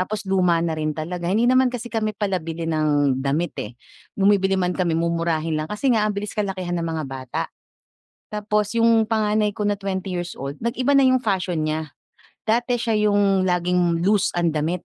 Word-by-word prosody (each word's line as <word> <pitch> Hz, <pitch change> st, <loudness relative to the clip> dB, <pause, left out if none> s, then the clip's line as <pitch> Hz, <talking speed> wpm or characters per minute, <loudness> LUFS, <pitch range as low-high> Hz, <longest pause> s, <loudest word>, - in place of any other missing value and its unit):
Tapos 210 Hz, +3 st, -3 dB
luma 180 Hz, -3 st, +2 dB
na 165 Hz, -, -1 dB
rin 155 Hz, -1 st, -2 dB
talaga, 170 Hz, +2 st, -4 dB
hindi 215 Hz, +5 st, +2 dB
naman 255 Hz, 0 st, +4 dB
kasi 240 Hz, -1 st, -6 dB
kami 215 Hz, -2 st, -1 dB
pala 195 Hz, -3 st, 0 dB
bili 165 Hz, +1 st, -5 dB
ng 145 Hz, -4 st, +1 dB
damit, 145 Hz, +6 st, -1 dB
eh. 105 Hz, -, -5 dB, 0.5 s
Bumibili 195 Hz, -1 st, +3 dB
man 180 Hz, -1 st, 0 dB
kami 175 Hz, -2 st, 0 dB
mumurahin 165 Hz, -1 st, 0 dB
lang 155 Hz, -, -5 dB
kasi 230 Hz, +6 st, 0 dB
nga 215 Hz, -2 st, +2 dB
ang 210 Hz, -, -2 dB
bilis 205 Hz, 0 st, -4 dB
kalakihan 190 Hz, -4 st, -3 dB
ng 170 Hz, -, -2 dB
mga 160 Hz, -2 st, -3 dB
bata. 130 Hz, -2 st, -4 dB, 0.9 s
Tapos 210 Hz, +1 st, -1 dB
yung 230 Hz, -1 st, +4 dB
panganay 215 Hz, -2 st, +1 dB
ko 210 Hz, -, -3 dB
na 205 Hz, -1 st, +1 dB
twenty 195 Hz, -1 st, -3 dB
years 175 Hz, 0 st, -4 dB
old, 140 Hz, +2 st, -6 dB
nag-iba 245 Hz, +4 st, 0 dB
na 275 Hz, -, +5 dB
yung 255 Hz, -1 st, +3 dB
fashion 185 Hz, -6 st, 0 dB
niya. 155 Hz, -1 st, -3 dB, 0.5 s
Dati 240 Hz, +2 st, +1 dB
siya 230 Hz, -1 st, 0 dB, 0.2 s
yung 200 Hz, -2 st, +3 dB
laging 175 Hz, -1 st, +1 dB
loose 205 Hz, -1 st, +3 dB
ang 170 Hz, -2 st, +2 dB
damit 165 Hz, +4 st, -1 dB
185 Hz, 190 wpm, -22 LUFS, 165-210 Hz, 0.9 s, na